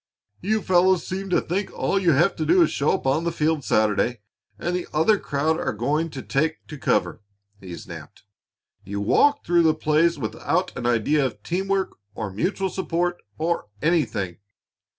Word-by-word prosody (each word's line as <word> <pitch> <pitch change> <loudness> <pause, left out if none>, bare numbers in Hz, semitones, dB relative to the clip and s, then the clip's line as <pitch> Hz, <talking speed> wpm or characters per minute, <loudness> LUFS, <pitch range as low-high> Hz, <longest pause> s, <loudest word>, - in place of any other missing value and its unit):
"You 215 +2 0
fellows 185 -1 +3
seem 195 +1 -4
to 180 - +3
think 190 +4 -3
all 195 - 0
you 175 -4 +3
have 170 +7 +3
to 160 - -1
do 360 -1 +6
is - - +1
to - - -5
show 140 - +2
up - - -3
on 135 +5 +1
the 170 - 0
field 155 -2 0
Saturday 110 +2 +1 0.4
and 175 +9 -2
the 180 - -3
other 175 +7 +3
crowd 155 +3 0
are - - -1
going 150 +10 -1
to 135 -4 -7
take 155 +3 -1
to 150 - -8
cover!" 115 - 0 0.4
he 90 -3 -8
snapped. - - -11 0.6
"You 100 +1 -5
walk 285 - +3
through 175 0 +4
the 160 -1 +3
plays 155 +2 +2
without 165 +9 -2
an 120 - -3
idea 120 +5 +2
of 130 - -4
team 185 +3 -2
work, 195 -1 -1 0.2
or 105 -3 -4
mutual 190 - -1
support, 175 -1 -2 0.2
or 165 -7 -1
anything. 125 - 0
160 Hz, 185 wpm, -24 LUFS, 135-180 Hz, 0.6 s, do